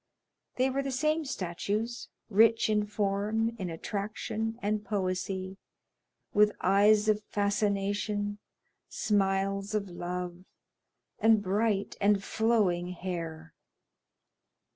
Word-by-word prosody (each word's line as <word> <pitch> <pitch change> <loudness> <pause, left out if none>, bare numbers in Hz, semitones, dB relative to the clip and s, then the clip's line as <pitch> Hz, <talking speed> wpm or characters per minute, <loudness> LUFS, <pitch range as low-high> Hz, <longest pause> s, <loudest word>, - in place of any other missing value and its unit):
They 260 +1 +2
were 275 +1 0
the 275 - -3
same 305 +4 0
statues, 210 +2 -3 0.2
rich 225 +1 +4
in 210 -1 +1
form, 210 +2 0
in 185 -2 -3
attraction, 215 +5 -3
and 210 0 -1
poesy, 190 -1 -2 0.8
with 210 0 +5
eyes 210 +2 +4
of 215 -1 +3
fascination, 205 0 -1 0.5
smiles 195 0 0
of 200 -2 -1
love, 175 0 -5 0.8
and 220 -2 +4
bright 205 +1 0
and 200 -1 +3
flowing 200 -7 +1
hair. 165 -3 -5
205 Hz, 100 wpm, -30 LUFS, 190-215 Hz, 0.8 s, with